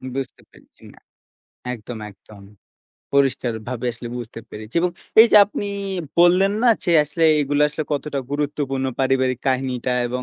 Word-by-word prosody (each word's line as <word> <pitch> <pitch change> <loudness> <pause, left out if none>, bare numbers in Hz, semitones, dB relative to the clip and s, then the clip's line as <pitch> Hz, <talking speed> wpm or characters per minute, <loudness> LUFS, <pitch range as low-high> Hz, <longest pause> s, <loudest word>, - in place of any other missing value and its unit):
বুঝতে 135 -2 -5
পেরেছি - - -23
না - - -19 0.8
একদম, 115 0 -9
একদম। 100 0 -17 0.7
পরিষ্কারভাবে 125 -3 0
আসলে 120 +1 -8
বুঝতে 115 -1 -7
পেরেছি 110 +1 -10
এবং 180 +1 +1 0.3
এই 230 - +9
যে - - +8
আপনি 205 0 -5 0.5
বললেন 185 +3 +5
না 245 - +5 0.2
যে 175 - +1
আসলে 155 +3 -1
এইগুলা 145 0 +1
আসলে 150 +1 -5
কতটা 145 -1 -2
গুরুত্বপূর্ণ 145 -2 -2 0.2
পারিবারিক 130 -2 +1
কাহিনীটা 130 -1 -1 0.2
এবং 125 +1 -3
135 Hz, 140 wpm, -21 LUFS, 120-150 Hz, 0.8 s, এই